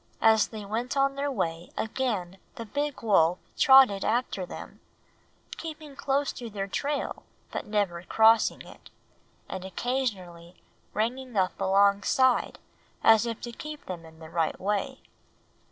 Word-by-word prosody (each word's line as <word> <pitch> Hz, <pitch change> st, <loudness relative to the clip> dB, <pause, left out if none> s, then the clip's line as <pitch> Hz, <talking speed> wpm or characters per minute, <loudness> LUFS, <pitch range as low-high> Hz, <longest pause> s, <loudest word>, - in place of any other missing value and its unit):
As 220 Hz, -1 st, +5 dB
they 215 Hz, -2 st, -8 dB
went 235 Hz, +6 st, -3 dB
on 275 Hz, 0 st, +3 dB
their 280 Hz, +1 st, -2 dB
way 165 Hz, -8 st, -3 dB
again 210 Hz, -6 st, -2 dB, 0.2 s
the 230 Hz, -, -6 dB
big 285 Hz, +4 st, -3 dB
wolf 180 Hz, -5 st, +4 dB, 0.2 s
trotted 265 Hz, -7 st, +6 dB
after 220 Hz, -5 st, -1 dB
them, -, -, -9 dB, 0.8 s
keeping 310 Hz, -3 st, -8 dB
close 280 Hz, +1 st, 0 dB
to 240 Hz, -2 st, -7 dB
their 200 Hz, -2 st, -4 dB
trail 285 Hz, +9 st, -3 dB, 0.3 s
but -, -, -5 dB
never 200 Hz, -5 st, 0 dB
crossing 220 Hz, +4 st, +4 dB
it, -, -, -15 dB, 0.6 s
and 185 Hz, -, -6 dB
occasionally 190 Hz, -5 st, -3 dB, 0.4 s
ranging 245 Hz, +2 st, -2 dB
up 185 Hz, 0 st, 0 dB
alongside, 200 Hz, +6 st, +3 dB, 0.5 s
as 225 Hz, +1 st, +6 dB
if 230 Hz, -1 st, -4 dB
to 240 Hz, -, -6 dB
keep 300 Hz, +5 st, -8 dB
them 175 Hz, -3 st, -6 dB
in 160 Hz, 0 st, -15 dB
the 160 Hz, 0 st, -12 dB
right 165 Hz, -2 st, -1 dB
way. 210 Hz, +7 st, -2 dB
220 Hz, 135 wpm, -27 LUFS, 190-260 Hz, 0.8 s, trotted